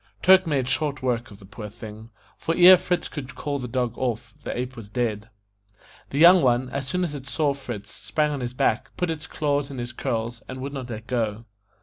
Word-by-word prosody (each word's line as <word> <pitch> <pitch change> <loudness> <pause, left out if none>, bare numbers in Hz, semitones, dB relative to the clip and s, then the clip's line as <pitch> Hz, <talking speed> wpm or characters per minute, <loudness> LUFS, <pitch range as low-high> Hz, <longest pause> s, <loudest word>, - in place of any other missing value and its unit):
Turk 190 -1 +7
made 135 -5 +1
short 145 -1 -1
work 120 -2 0
of 100 - -12
the 100 - -15
poor 105 +2 -8
thing, 110 +2 -10 0.3
for 165 - -2
ere 180 +1 +10
Fritz 180 0 -1
could 130 -4 -7
call 145 -1 -3
the 125 - -4
dog 125 -1 -1
off, 120 -2 -2
the - - -4
ape 125 +1 -3
was 110 -3 -10
dead. 110 -2 -2 0.8
The 140 - -4
young 175 +3 +8
one, 125 -1 +2
as 140 -1 -3
soon 180 +6 0
as 165 -4 -2
it 135 -2 -7
saw 145 0 +1
Fritz, 120 -7 -7
sprang 150 -1 -1
on 145 - -3
his 125 0 -4
back, 115 -2 +1
put 180 -2 0
its 155 -1 -5
paws 145 -2 -1
in 135 - -7
his 120 0 -5
curls, 115 +1 -3
and 130 0 -7
would 140 +2 -5
not 130 -3 -5
let 110 -1 -6
go. 115 -3 -2
130 Hz, 225 wpm, -25 LUFS, 115-145 Hz, 0.8 s, ere